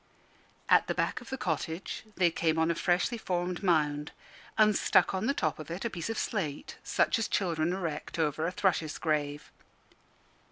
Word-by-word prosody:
At - - +5
the - - -1
back - - -1
of 245 - -12
the 265 - -3
cottage 165 - -3
they 175 -2 +3
came 165 -1 +1
on 160 +1 +3
a - - +2
freshly 175 +7 +1
formed 180 -3 -2
mound, 150 -5 +1 0.5
and 215 -1 +5
stuck - - +3
on 190 +4 -1
the 275 - +3
top 155 -2 -1
of 155 - -8
it 175 +6 -4
a 235 - -1
piece 170 +1 -4
of 225 - -2
slate, 155 -10 -3
such - - +2
as 225 - 0
children 170 -3 0
erect 170 -6 -4
over 155 0 0
a - - -1
thrush's 175 -5 0
grave. 145 -2 -1
170 Hz, 185 wpm, -30 LUFS, 155-190 Hz, 0.5 s, At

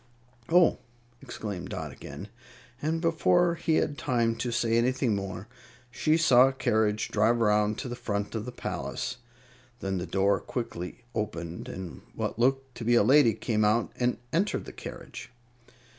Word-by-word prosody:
"Oh!" 175 0 +5 0.4
exclaimed 100 -5 -6
Dot - - -5
again, 100 - -9 0.5
and 160 +2 -1
before 170 +1 +3
he 165 -1 0
had 145 - 0
time 115 -4 +1
to 120 +2 -2
say 115 -1 +1
anything 125 0 +2
more 95 0 -5 0.4
she 155 +6 +2
saw 130 -6 +6
a 135 - -1
carriage 110 -4 +1
drive 110 +3 +2
around 105 -1 +2
to 135 - -4
the 120 - -4
front 105 -4 -3
of 110 -1 -3
the 125 - -5
palace. 125 - -4 0.6
Then 95 -1 -2
the 90 - -4
door 95 +2 +2
quickly 115 -3 -5
opened, 90 -6 -4
and 95 -3 -7
what - - -3
looked 135 +1 +1
to - - -5
be 120 +1 +3
a 120 - +5
lady 125 -2 +5
came 110 -2 0
out 110 +3 +2
and 125 0 0 0.2
entered 190 +6 0
the - - -9
carriage. - - -9
115 Hz, 160 wpm, -28 LUFS, 105-135 Hz, 0.6 s, saw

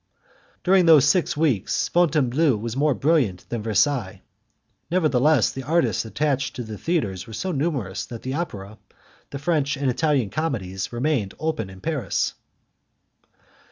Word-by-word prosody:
During 185 -1 +4
those 155 -5 +7
six 180 -5 +2
weeks 145 - +1
Fontainebleau 150 -4 +2
was 115 +2 -5
more 145 0 +2
brilliant 135 - +1
than 120 -2 -3
Versailles; 110 0 0 0.7
nevertheless, 155 -6 +3
the 135 - -6
artists 130 - +1
attached 135 +3 -1
to 125 - -4
the 110 -1 -7
theatres 100 - -2
were 110 - -10
so 185 - -3
numerous 135 - -2
that 115 -2 -9
the 130 - -3
Opera, 110 - -5 0.5
the 140 - -6
French 140 -2 0
and 135 -2 +1
Italian 130 -5 0
Comedies, 95 - -3
remained 120 -5 -1
open 155 -11 -2
in 95 0 -13
Paris. 150 -10 -1
135 Hz, 140 wpm, -23 LUFS, 110-155 Hz, 0.7 s, those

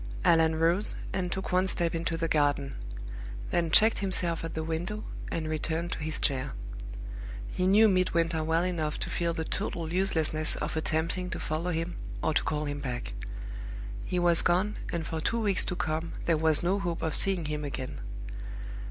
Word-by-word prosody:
Allan 160 -1 +5
rose, 170 +6 +6 0.2
and 180 -2 -1
took 190 +1 -3
one 185 +1 +3
step 170 -3 +2
into 165 0 -1
the 165 0 0
garden; 145 -3 +1 0.8
then 170 -1 +1
checked 220 +7 +6
himself 180 -4 0
at 165 - -5
the 160 - -2
window, 175 +7 -3 0.3
and 160 -1 -2
returned 160 +2 -2
to - - -3
his 155 0 -2
chair. 130 -3 +1 1.0
He 185 - 0
knew 210 +3 +7
Midwinter 170 -4 +2
well 165 +2 +2
enough 160 -4 -1
to - - -3
feel 170 -1 0
the 160 - -2
total 165 0 -2
uselessness 160 -5 +2
of 150 +1 -3
attempting 160 +3 0
to - - -2
follow 160 +3 -2
him 165 +1 -2 0.3
or 160 - +2
to - - +2
call 150 0 -1
him 145 0 -3
back. 120 - -4 0.9
He 180 - -2
was 175 -1 +5
gone, 190 +5 +2
and 170 -2 -2
for 160 0 -3
two 230 +8 0
weeks 205 -4 +3
to 180 - -2
come 160 0 -2
there 165 - +3
was 155 0 +3
no 190 +3 +2
hope 175 -3 -2
of 160 - 0
seeing 190 -4 +4
him 150 0 -2
again. 135 -3 -5
165 Hz, 180 wpm, -29 LUFS, 155-180 Hz, 1.0 s, knew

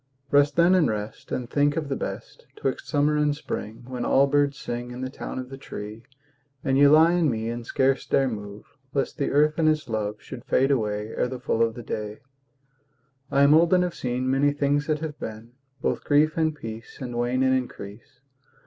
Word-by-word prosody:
Rest 145 0 +4
then 170 +2 +5
and 170 -8 +4
rest, 105 0 -5
And 125 - -2
think 145 +3 +1
of 155 -2 -2
the 135 - -2
best - - -7
'Twixt 135 - -3
summer 150 0 +2
and 150 -1 +2
spring, 110 -6 -6
When 125 -1 -5
all 135 - +4
birds 140 0 +1
sing 120 +1 -5
In 125 +1 -7
the 130 0 -4
town - - -6
of 130 0 -5
the 135 0 -9
tree, 105 -3 -8 0.6
And 135 - +1
ye 140 +1 +7
lie 160 +3 +6
in 170 -4 +2
me 115 -1 -2
And 120 0 -5
scarce 135 +3 +1
dare 135 - +2
move, 105 -3 -6 0.3
Lest 140 +3 -1
the 140 - 0
earth 150 +2 +2
and 155 -1 +4
its 155 -3 0
love 105 -2 -2
Should 130 -2 -10
fade 135 +1 +2
away 105 -4 -1
Ere 120 - -1
the 130 0 -6
full 115 - -1
of 115 -1 +2
the 120 - -8
day. 105 -1 -4 1.1
I 140 - +3
am 140 +1 +6
old 170 +3 +5
and 180 - +3
have 180 -1 -2
seen 125 +1 -2
Many 135 +2 +2
things 145 0 0
that 155 -1 0
have 155 -2 -5
been; 110 +1 -7 0.3
Both - - 0
grief 155 +2 +3
and 160 -2 +1
peace 115 -4 -8
And 125 -2 -5
wane 120 +2 +1
and 130 0 +3
increase. 125 +1 -6
135 Hz, 210 wpm, -25 LUFS, 115-145 Hz, 1.1 s, ye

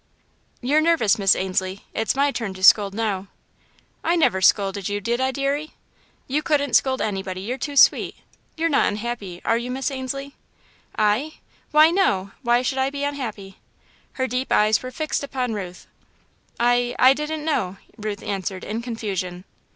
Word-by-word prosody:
"You're 285 +5 +3
nervous, 310 -10 +3
Miss 195 -1 +4
Ainslie 190 +1 -2
it's 220 +3 0
my 280 +1 +2
turn 220 -7 -4
to 185 - -9
scold 200 +1 +6
now." 205 -4 -2 0.8
"I 335 +2 +2
never 190 - +2
scolded 195 0 +2
you, 205 0 -2
did 235 +4 -1
I 260 - +2
deary?" 280 +3 -2 0.5
"You 285 +3 0
couldn't 285 -4 0
scold 260 +3 +2
anybody 190 -3 -3
you're 245 +7 -4
too 290 -2 -4
sweet. - - +5 0.4
You're 330 +1 +1
not 295 - +3
unhappy, 205 -4 -4
are 230 - +2
you, 240 +1 -5
Miss 265 +2 -2
Ainslie?" 275 +1 -5 0.6
"I? 215 +9 +1 0.4
Why, 310 +2 +6
no! 200 - +1
Why 240 -1 +2
should 265 +1 -1
I 265 +1 +2
be 285 0 -5
unhappy?" 225 -9 -5 0.5
Her 260 - -1
deep 255 +1 -3
eyes 215 +1 +4
were 255 - -6
fixed 305 +3 -3
upon 255 -4 -2
Ruth. 180 -4 -7 0.7
"I 245 +1 +2
I 260 +1 +7
didn't 300 +1 -4
know," 195 - -1 0.2
Ruth 210 -2 -5
answered, 195 -2 -4
in 220 +3 -4
confusion. 195 -7 -4
240 Hz, 165 wpm, -23 LUFS, 200-275 Hz, 0.8 s, I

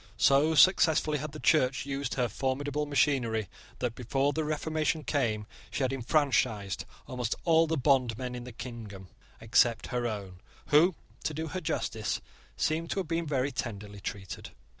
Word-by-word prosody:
So 145 +4 +4
successfully 155 -3 +5
had 150 +1 -5
the 155 - -8
Church 135 -6 +3
used 140 -1 -3
her 125 -2 +1
formidable 140 +5 -2
machinery 125 -7 +1 0.3
that, 125 -2 -2
before 135 +4 0
the 160 - -1
Reformation 155 +1 -1
came, 115 -7 0 0.2
she 140 - -2
had 130 0 +1
enfranchised 120 - +1 0.2
almost 125 -3 -2
all 165 -1 +5
the 160 0 0
bondmen 125 -3 +1
in 125 -1 -6
the 125 - -8
kingdom 115 -6 -8 0.3
except 115 +1 +3
her 120 -1 0
own, 100 -5 -6 0.3
who, 160 +4 +5 0.3
to 155 - -2
do 160 +1 -3
her 185 +4 -4
justice, 110 -8 -2 0.4
seem 160 +2 0
to 195 - -2
have 180 - -7
been 165 0 -1
very 140 -1 0
tenderly 105 -4 -5
treated. 95 -1 -6
135 Hz, 160 wpm, -30 LUFS, 115-155 Hz, 0.4 s, successfully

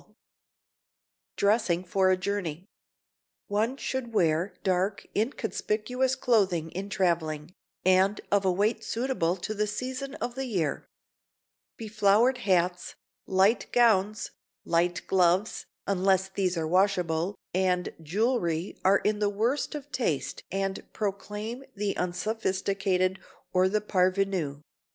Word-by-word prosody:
[Sidenote: - - -28 1.2
DRESSING 200 -4 +2
FOR 185 +1 +2
A 185 - +3
JOURNEY] 185 -3 -3 0.8
One 220 +6 0
should 260 -4 -4
wear 165 +1 +2
dark 185 +2 0
inconspicuous 245 +2 -1
clothing 195 -11 +1
in 195 +3 -5
traveling, 170 -4 -1 0.3
and 185 +2 +4
of 200 -1 +3
a 190 - +3
weight 205 +5 0
suitable 230 -8 0
to 195 +4 -4
the 210 0 0
season 255 +6 -4
of 245 - -4
the 265 +1 -4
year. 175 - -1 0.9
Beflowered 215 +3 +3
hats, 180 -4 0 0.3
light 190 +4 +3
gowns, 215 -4 +3 0.3
light 175 +1 +1
gloves—unless 190 +1 +1
these 190 -2 -1
are 160 -1 -1
washable—and 180 0 0
jewelry 180 - -1
are 195 +1 +5
in 210 +1 0
the 205 -1 +2
worst 230 +10 -1
of 290 -1 -8
taste 155 - -1
and 195 0 -2
proclaim 210 +4 -4
the 205 0 -1
unsophisticated 190 -1 0 0.3
or 185 0 +4
the 210 +2 +1
parvenu. 185 -7 0
195 Hz, 115 wpm, -28 LUFS, 180-215 Hz, 1.2 s, are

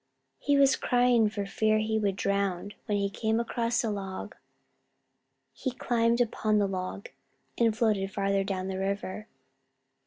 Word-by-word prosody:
He 285 0 +2
was 275 -1 +5
crying 245 -3 +3
for 205 -1 -4
fear 215 +2 +1
he 220 0 0
would 200 -3 0
drown 200 0 -1
when 205 - +1
he 200 0 +1
came 220 +3 -1
across 235 0 0
a 225 - 0
log. 195 -2 -5 1.2
He 260 - -3
climbed 235 -1 +1
upon 215 -2 +1
the 205 - +3
log, 185 +1 -5 0.5
and 225 -2 +2
floated 210 -4 +1
farther 195 0 +1
down 190 -1 -3
the 190 0 -3
river. 200 +2 -3
210 Hz, 150 wpm, -28 LUFS, 195-230 Hz, 1.2 s, was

